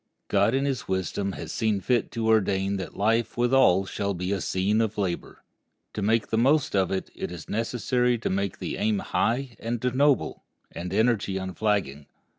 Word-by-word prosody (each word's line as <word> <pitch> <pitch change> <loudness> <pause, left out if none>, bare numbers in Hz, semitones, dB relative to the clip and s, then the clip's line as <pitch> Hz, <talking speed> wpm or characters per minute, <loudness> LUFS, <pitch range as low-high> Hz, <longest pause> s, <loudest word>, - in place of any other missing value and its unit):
God 115 - +3
in 135 +1 +1
his 130 -3 -2
wisdom 95 +1 -2
has 80 -2 -6
seen 110 -3 0
fit 120 +2 +1
to 115 - -3
so - - +2
ordain 100 -2 +2
that 95 - -7
life 115 +4 +1
with 120 +1 +1
all 95 -8 +5
shall 100 0 -2
be 90 +2 -3
a 100 -2 -1
scene 100 +6 +1
of 110 -1 -1
labor. 95 -4 -3 0.5
To 105 - -4
make 110 +2 +1
the 110 - +1
most 145 +3 +3
of 95 -2 +2
it, 95 - -3
it - - -5
is 85 -3 -8
necessary 120 +2 0
to 115 - -3
make 100 -1 -1
the - - -4
aim 110 -1 +1
high 120 +5 -1
and 115 +1 -3
noble, 140 0 +2 0.3
the - - -7 0.2
energy 110 -4 +2
unflagging. 95 -7 -1
105 Hz, 190 wpm, -26 LUFS, 95-120 Hz, 0.5 s, all